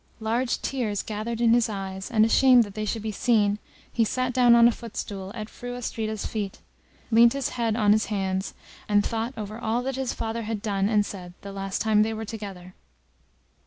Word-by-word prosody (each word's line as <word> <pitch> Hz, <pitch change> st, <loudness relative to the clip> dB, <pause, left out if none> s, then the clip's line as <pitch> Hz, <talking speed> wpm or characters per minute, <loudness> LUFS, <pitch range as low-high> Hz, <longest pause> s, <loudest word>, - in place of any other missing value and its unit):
Large 230 Hz, +3 st, -1 dB
tears 225 Hz, -7 st, -1 dB
gathered 220 Hz, +2 st, -4 dB
in 230 Hz, -1 st, +5 dB
his 235 Hz, -1 st, +3 dB
eyes, 195 Hz, -2 st, -5 dB
and 220 Hz, -3 st, +4 dB
ashamed 250 Hz, +1 st, +6 dB
that 205 Hz, -2 st, -9 dB
they 215 Hz, +1 st, -3 dB
should 215 Hz, +1 st, -3 dB
be 220 Hz, -, -2 dB
seen, 210 Hz, -1 st, +2 dB, 0.3 s
he 230 Hz, -, +3 dB
sat 255 Hz, +3 st, -1 dB
down 245 Hz, -1 st, +6 dB
on 235 Hz, 0 st, +7 dB
a -, -, +4 dB
footstool 205 Hz, -4 st, -6 dB
at 215 Hz, -2 st, -5 dB
Fru 245 Hz, +2 st, -7 dB
Astrida's 220 Hz, -3 st, -3 dB
feet, 205 Hz, -3 st, -4 dB, 0.5 s
leant 235 Hz, +1 st, +6 dB
his 275 Hz, -2 st, -2 dB
forehead 230 Hz, -3 st, 0 dB
on 210 Hz, -3 st, +3 dB
his 215 Hz, +1 st, +3 dB
hands, 190 Hz, -2 st, -2 dB, 0.3 s
and 205 Hz, 0 st, +3 dB
thought 230 Hz, +3 st, -2 dB
over 215 Hz, +1 st, -6 dB
all 230 Hz, +2 st, -1 dB
that 265 Hz, 0 st, -3 dB
his 265 Hz, -2 st, -1 dB
father 225 Hz, +1 st, -3 dB
had 220 Hz, -1 st, -3 dB
done 200 Hz, -2 st, 0 dB
and 210 Hz, -2 st, +3 dB
said 180 Hz, -3 st, -8 dB
the 200 Hz, -, -8 dB
last 195 Hz, -1 st, -3 dB
time 215 Hz, -1 st, +4 dB
they 220 Hz, +1 st, +1 dB
were 220 Hz, +1 st, -5 dB
together. 195 Hz, -4 st, -8 dB
220 Hz, 200 wpm, -26 LUFS, 205-235 Hz, 0.5 s, on